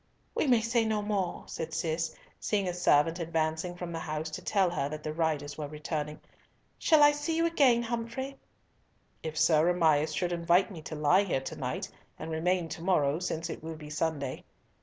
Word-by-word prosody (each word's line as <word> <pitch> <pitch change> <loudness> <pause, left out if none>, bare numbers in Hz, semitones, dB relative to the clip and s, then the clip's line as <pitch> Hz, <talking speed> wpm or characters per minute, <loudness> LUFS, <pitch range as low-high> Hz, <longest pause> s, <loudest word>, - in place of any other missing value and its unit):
"We - - 0
may 240 -3 +5
say 230 +1 +2
no 215 -1 0
more," 200 -4 -1
said 160 0 -5
Cis, 165 0 -1 0.2
seeing 200 -3 0
a 180 - -1
servant 165 -1 +3
advancing 160 +1 -1
from 175 -1 -6
the 165 - -3
house 155 0 -4
to - - -5
tell 190 -4 +2
her 140 -5 -1
that 155 0 -6
the 155 - -3
riders 155 -2 -1
were 150 - -3
returning. 150 0 -4 0.6
"Shall 310 -2 +5
I 290 - +8
see 295 +3 -2
you 330 - +3
again, 270 -8 +4
Humfrey?" 235 +4 -4 0.8
"If 160 -1 -5
Sir 160 +1 +4
Amias 160 -3 +3
should 180 -1 0
invite 175 +3 +3
me 170 -5 -8
to 155 - -7
lie 155 +6 +4
here 180 -9 -1
to 135 - -6
night, - - -3 0.3
and 160 +1 -6
remain 170 +2 +1
to 160 - -6
morrow, 155 -4 +2
since 170 -2 -2
it - - -6
will 160 0 -5
be 150 -1 -10
Sunday." 150 -4 -2
165 Hz, 195 wpm, -30 LUFS, 155-200 Hz, 0.8 s, I